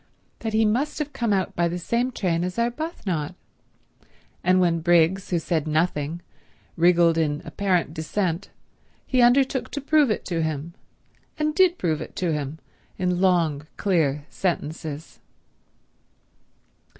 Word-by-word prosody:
—that 225 - -3
he 220 0 +3
must 245 +8 0
have 295 -2 -3
come 235 -4 -1
out 190 -2 0
by 170 0 +2
the 170 +1 -3
same 235 +8 0
train 175 -7 0
as 180 +3 -4
Arbuthnot, 235 - -2 1.1
and 185 +1 +4
when 170 -2 +2
Briggs, 175 +3 +3
who 175 - +1
said 160 -2 -1
nothing, 155 +1 -1 0.5
wriggled 170 -1 +4
in 150 -2 0
apparent 185 -6 0
dissent, 170 +2 -2 0.6
he 255 -2 +2
undertook 260 +2 +3
to 285 - -4
prove 290 -1 +3
it 215 - -1
to 170 -3 -1
him, 160 +1 -3 0.6
and 305 0 0
did 365 +1 +4
prove 160 -3 -1
it - - -8
to 175 -3 0
him 150 0 -3 0.4
in 180 -1 0
long 165 -6 +2
clear 150 -7 +1
sentences. 160 -4 -3
180 Hz, 140 wpm, -24 LUFS, 160-225 Hz, 1.1 s, and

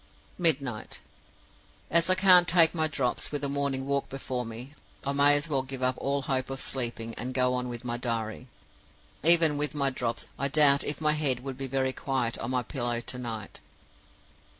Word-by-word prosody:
"Midnight. 140 -10 -1 0.9
As 170 +1 +4
I 185 - +4
can't 185 -2 +6
take 165 -2 +5
my 160 -2 +1
drops, 135 -5 -2
with 145 -1 -3
a - - +1
morning 140 -1 -2
walk 140 0 -2
before 130 -3 -4
me, 120 +5 -8 0.3
I 140 - 0
may 140 +1 +5
as 145 +2 0
well 140 -4 0
give 130 -1 -7
up 130 0 +2
all 140 0 -1
hope 130 -1 -1
of 135 0 -5
sleeping, 120 -4 -2
and 125 +1 -4
go 125 -1 +2
on 125 0 -2
with 120 0 -7
my 120 0 -2
diary. 115 0 -4 0.8
Even 165 -2 +5
with 150 +1 0
my 140 -2 +1
drops, 120 -2 -3
I 140 - +1
doubt 140 -1 +5
if 145 - -3
my 155 -1 +3
head 145 -5 0
would 135 0 -6
be 135 +1 -5
very 130 0 -1
quiet 130 -5 -2
on - - -4
my 125 -1 0
pillow 120 -2 -3
to 120 +2 -4
night. 110 -4 -6
135 Hz, 195 wpm, -27 LUFS, 125-145 Hz, 0.9 s, can't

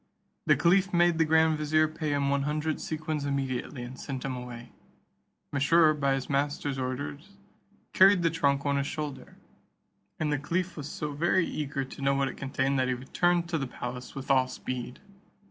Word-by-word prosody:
The - - +6
caliph 185 +3 +3
made 175 -1 +3
the 160 - +5
grand 160 0 +3
vizier 155 +1 +3
pay 155 -1 -3
him 140 -1 +1
one 140 0 +1
hundred 150 +2 -1
sequins 155 -1 -3
immediately, 135 -2 -2
and 125 +2 -9
sent 130 -2 -5
him 130 -2 -2
away. 120 -1 -8 0.8
Mesrour, 155 +3 +5
by 140 -2 +1
his 135 -1 -4
master's 145 -1 -1
order, 130 +2 -3 0.7
carried 190 -1 +6
the 165 - +3
trunk 140 -3 +1
on 140 0 +1
his 140 0 -1
shoulder, 145 -5 -6 0.8
and 150 -1 0
the 145 - 0
caliph 175 +5 -2
was 145 -2 -6
so 150 -1 -4
very 170 +4 +2
eager 140 -3 -3
to 135 - -11
know 140 0 +2
what 135 -1 +1
it - - -8
contained, 135 0 -1
that 130 - +2
he 130 - 0
returned 170 +7 +1
to 165 -2 0
the 135 - -2
palace 125 0 -7
with 135 0 -3
all 130 -1 +4
speed. 125 0 -5
145 Hz, 185 wpm, -28 LUFS, 135-155 Hz, 0.8 s, The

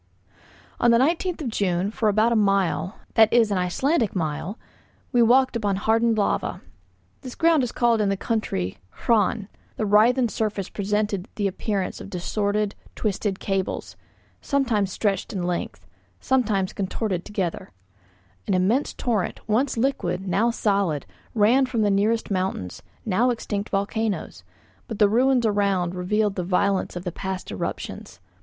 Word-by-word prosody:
On 240 - +4
the 235 - +6
19th 330 +5 +1
of 250 - -2
June, 195 -2 0
for 220 -1 +1
about 215 +3 +3
a - - +2
mile, 195 -4 +1 0.2
that 220 -1 +5
is 230 -3 +4
an 195 - +1
Icelandic 225 - 0
mile, 165 +4 -3 0.5
we 245 -3 +4
walked 255 +2 +4
upon 205 -4 0
hardened 225 +3 +2
lava; 205 - 0 0.6
this 255 - -8
ground 330 -3 +4
is 250 -2 -2
called 235 -2 +2
in 205 - +2
the 195 - 0
country 95 - -2 0.3
'hraun'; 215 -2 +2 0.3
the 215 - -1
writhen 235 +5 +4
surface 210 -3 -2
presented 205 -1 -1
the 205 - -1
appearance 195 0 -2
of - - -9
distorted, 205 +3 -1 0.2
twisted 200 -2 -2
cables, 195 -1 -3 0.5
sometimes 230 -9 0
stretched 200 +1 -1
in 185 -3 -2
length, 175 0 -3 0.3
sometimes 215 -8 +1
contorted 195 -2 -2
together; 190 -5 -3 0.8
an - - +2
immense 205 +10 +1
torrent, 220 -7 -1
once 240 +5 +1
liquid, 195 -7 -1
now 200 +6 +2
solid, 200 - 0 0.3
ran 235 +5 +4
from 235 -4 0
the 205 - +2
nearest 210 +3 +1
mountains, 185 - -2 0.2
now 225 +4 +2
extinct 210 -4 -3
volcanoes, 200 - -2 0.4
but 220 - -5
the 210 - +5
ruins 250 +3 +3
around 200 -4 +1
revealed 205 +3 0
the 180 - -1
violence 190 +2 0
of 175 - -5
the 180 - -3
past 190 - -5
eruptions. 95 -1 -5
205 Hz, 150 wpm, -24 LUFS, 190-230 Hz, 0.8 s, the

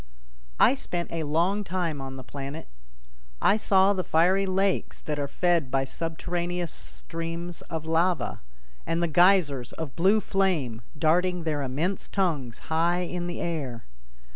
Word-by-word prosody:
I - - +7
spent 175 -10 -4
a 165 - -2
long 180 +7 +2
time 170 -6 -2
on 135 0 -6
the 130 - -8
planet. 140 +4 -7 0.7
I - - +4
saw 195 -2 +4
the 185 -2 -1
fiery 185 +5 +3
lakes 190 +1 0
that 150 -1 -3
are 140 - -1
fed 170 -2 +1
by 135 +1 +1
subterraneous 170 +3 -3
streams 165 +1 -5
of 160 -1 -4
lava, 165 +2 +1 0.5
and 165 +1 +1
the - - +2
geysers 160 -7 +3
of 160 -5 -6
blue 195 +6 +4
flame 175 - 0 0.2
darting 175 +3 +2
their 155 -3 -1
immense 150 +9 -2
tongues 150 - -1 0.2
high 170 +2 +2
in 175 0 -3
the 175 - -4
air. 140 -9 -3
170 Hz, 145 wpm, -27 LUFS, 150-180 Hz, 0.7 s, I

